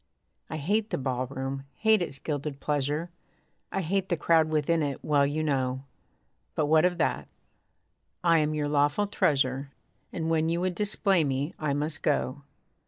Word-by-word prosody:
I 160 - -4
hate 205 +8 0
the - - -1
ballroom; 135 +1 -3
hate 220 +2 +3
its 150 -6 -3
gilded 145 0 -4
pleasure; 150 +4 -1 0.6
I 195 - -1
hate 190 +2 -1
the 175 - +1
crowd 160 0 +3
within 155 +1 +1
it, 140 -3 -3
well 145 -2 +3
you 155 +2 -1
know; 130 -3 0 0.7
But 155 - +1
what 155 +2 +4
of 180 -1 +1
that? 165 - 0 1.0
I 165 -2 +5
am 155 0 0
your 150 -1 0
lawful 145 +6 +2
treasure 135 -7 +1 0.4
And 160 -2 -3
when 160 0 +2
you 170 +1 0
would 185 0 0
display 195 -2 +2
me 140 +2 -1
I 150 -2 0
must 150 +1 -2
go. 140 -1 0
150 Hz, 165 wpm, -28 LUFS, 140-170 Hz, 1.0 s, I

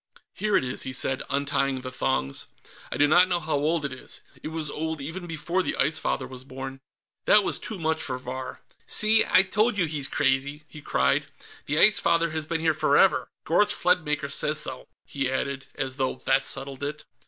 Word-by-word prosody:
"Here 210 -1 +1
it - - 0
is," 125 +1 -2
he 130 - -3
said, 130 +1 +1
untying 140 -1 0
the 130 0 -6
thongs. 70 - -1 0.4
"I - - -3
do 145 - +5
not 175 +4 +6
know 175 -1 0
how 160 -1 -3
old 150 +2 +1
it 140 - -3
is. 130 - -7 0.2
It - - -6
was 160 -1 0
old 160 +1 -3
even 165 +6 -6
before 165 +3 -1
the - - -2
Ice 155 - +1
Father 130 - -1
was 130 0 -10
born." 135 0 -8 0.4
That 210 - +6
was - - 0
too 220 - -2
much 160 -1 -1
for 130 -4 -3
Vahr. 130 +1 -7 0.3
"See, 220 +1 +4
I 185 - +5
told 215 +4 +1
you 180 - +3
he's 150 -3 -2
crazy!" 140 +3 0
he 150 -1 -11
cried. - - +1 0.4
"The 150 - 0
Ice 210 +5 +6
Father 170 -1 +2
has 155 -1 -3
been 165 0 -2
here 160 -1 +3
forever. 155 +4 +3 0.2
Gorth 190 +5 +3
Sledmaker 150 -5 +1
says 150 +2 +1
so," 130 -3 -4 0.2
he 135 -2 -2
added, 135 +1 -3
as 135 -1 -3
though 130 -2 0
that 135 0 +3
settled 135 0 -6
it. 150 +1 -4
150 Hz, 200 wpm, -26 LUFS, 135-165 Hz, 0.4 s, not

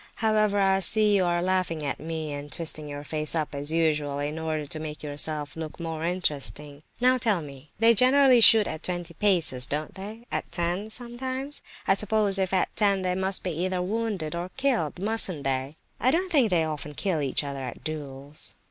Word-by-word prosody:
"However, 215 -2 +1
I 195 -1 +3
see 210 +2 +4
you 190 -2 +2
are 175 0 0
laughing 180 -4 -1
at 140 - -3
me 160 -1 -5
and 145 0 -7
twisting 155 0 -1
your 145 0 -7
face 155 +1 +1
up 155 -2 -2
as 145 +2 0
usual 150 -3 0
in 145 +2 -3
order 155 -2 -3
to 155 +2 -4
make 155 -1 -7
yourself 150 0 -4
look 160 0 -7
more 165 -1 -5
interesting. 150 -4 -3 0.2
Now 255 +1 +3
tell 210 -8 +1
me, 140 0 -12
they 230 +2 +5
generally 255 +2 +5
shoot 220 -1 +8
at 155 -3 -5
twenty 175 -2 -5
paces, 165 -9 +4
don't 150 +1 -4
they? 215 +4 -9
At - - -3
ten, 175 +4 -2
sometimes? 260 +4 -4 0.3
I - - +5
suppose 205 -1 +2
if 190 -1 0
at 190 - 0
ten 200 -3 +2
they 180 0 0
must 190 +1 0
be 180 - -2
either 180 +3 -2
wounded 200 -5 -3
or 175 +1 -4
killed, 250 - 0
mustn't 195 -6 +1
they?" 135 +2 -2 0.2
"I 255 - +2
don't 355 +6 0
think 270 -9 +4
they 175 -4 +2
often 150 -1 -5
kill 175 -3 -1
each 140 +1 0
other 140 -1 -5
at 125 -2 -7
duels." 145 -2 -7
175 Hz, 195 wpm, -26 LUFS, 150-210 Hz, 0.3 s, shoot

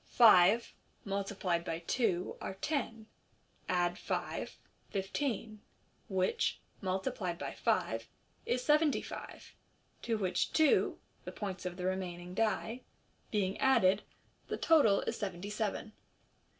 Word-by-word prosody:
Five 220 -1 +6 0.3
multiplied 195 -3 -1
by 165 -2 -3
two 185 -7 0
are 190 - -4
tenj 225 -2 -2 0.6
add 175 -1 +1
five, - - -3 0.3
fifteen, 215 +2 -2 0.5
which, 190 -1 +1 0.2
multiplied 185 -1 -2
by - - -5
five, - - 0 0.4
is 250 0 0
seventy 300 0 +3
five, - - -9 0.5
to 225 -1 0
which 185 -3 0
two 315 -2 +4 0.3
(the - - -6
points 190 -3 -4
of 180 0 -6
the 180 - -4
remaining 180 -1 -3
die) 225 +3 0 0.5
being 195 -2 0
added, 210 -7 +4 0.5
thf - - -2
total 280 -12 +5
is - - -3
seventy 195 0 -4
seven. 215 0 -2
195 Hz, 115 wpm, -33 LUFS, 185-225 Hz, 0.6 s, Five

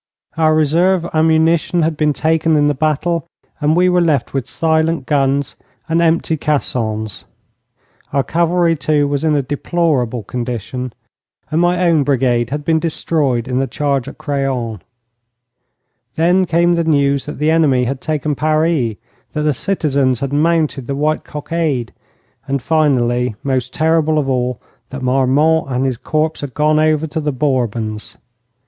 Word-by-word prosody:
Our 155 -1 +3
reserve 170 +4 +2
ammunition 160 +1 +2
had 160 0 0
been 150 0 +1
taken 160 +2 +1
in 145 -1 +3
the 145 - +2
battle, 155 +3 -1 0.3
and 150 +1 +2
we 180 +1 +4
were 180 -1 +3
left 150 -8 0
with 135 -3 -2
silent 160 -2 0
guns 140 -1 0 0.3
and 165 +1 +1
empty 165 -1 +1
caissons. 110 -8 -2 0.9
Our 140 - +1
cavalry, 170 +3 +1
too, 150 -1 +1
was 140 0 -2
in 155 -2 +2
a 140 - +1
deplorable 135 -5 -1
condition, 125 +2 -4 0.6
and 160 +2 +2
my 175 +1 +2
own 165 -3 +3
brigade 125 -4 +1
had 145 +1 -4
been 160 -1 +2
destroyed 150 -7 0
in 125 0 -1
the 135 - 0
charge 140 -3 -1
at - - -9
Craonne. 130 - -2 1.3
Then 175 +3 +3
came 170 +1 +3
the 170 -1 +1
news 140 -3 +1
that 150 - -6
the 155 +1 +1
enemy 145 -6 +3
had 130 +1 -3
taken 150 -1 -1
Paris, 155 -4 +1 0.4
that 150 - -2
the 150 -1 +2
citizens 140 - 0
had 140 0 -3
mounted 155 -4 +1
the 140 - -2
white 155 +2 0
cockade; 150 -5 -3 0.5
and 140 0 -1
finally, 125 -6 +1
most 130 -2 -1
terrible 160 0 +1
of 145 -3 0
all, 125 -2 -1 0.3
that 130 0 -7
Marmont 135 +5 +2
and 130 +1 -1
his 130 -3 -1
corps 155 +1 -1
had 140 -3 -7
gone 155 +1 +2
over 155 0 +2
to 160 0 -4
the 150 -1 -1
Bourbons. 120 -6 -2
150 Hz, 155 wpm, -17 LUFS, 130-160 Hz, 1.3 s, we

